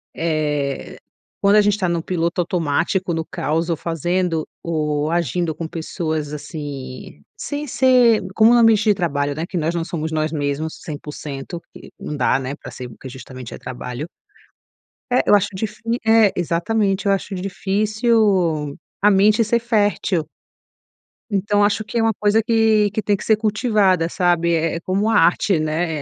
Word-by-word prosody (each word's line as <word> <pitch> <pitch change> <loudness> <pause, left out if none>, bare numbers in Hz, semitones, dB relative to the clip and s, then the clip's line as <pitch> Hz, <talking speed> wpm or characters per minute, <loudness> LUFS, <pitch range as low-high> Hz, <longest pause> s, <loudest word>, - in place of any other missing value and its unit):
eh, 150 -4 -2 0.4
quando 200 +1 +5
a - - +7
gente 205 0 +2
tá 185 -3 0
no 170 -1 0
piloto 170 0 -2
automático, 175 +1 0
no 160 0 -2
caos 160 +5 -2
ou 165 - +1
fazendo 170 +1 -1 0.2
ou 150 -2 -1
agindo 170 0 0
com 160 +1 -5
pessoas 160 -2 -3
assim, 140 - -7
sem 290 0 -5
ser 250 -4 +4
como 225 +2 +6
no 240 - +5
ambiente 220 -2 +4
de 210 - +5
trabalho, 145 -6 -1
né, 160 +2 -3
que 180 - -5
nós 165 +2 -1
não 165 - -1
somos 160 -2 -4
nós 155 0 0
mesmos 150 +1 -3
100% 150 +1 -7
e - - -12
não 150 - -5
dá, 135 0 +2
né, 135 +2 -4
pra 125 -4 -11
ser 125 +1 -7
porque 125 +3 -11
justamente 130 -1 -9
é - - -7
trabalho. 125 +4 -6 1.0
É, 250 - +3
eu 205 - +6
acho 205 0 +2
difí 230 +3 -3
é 220 -2 +5
exatamente, 195 +4 0
eu 200 - +3
acho 195 +1 -3
difícil 195 - +1 0.3
a 210 - +6
mente 210 +3 +4
ser 235 +2 +1
fértil. 205 -7 0 1.0
Então 205 +1 +1
acho 205 +1 +1
que 235 - -5
é - - +3
uma 225 -1 +2
coisa 210 +2 +3
que 220 -2 +3
que 220 - -2
tem 205 -1 +1
que - - -8
ser 220 - +4
cultivada, 210 -5 +2
sabe, 175 -1 +1
é 165 0 0
é - - -3
como 195 +5 0
a 225 - +2
arte, 170 +1 +3
né, 155 +1 -1
175 Hz, 170 wpm, -20 LUFS, 155-210 Hz, 1.0 s, a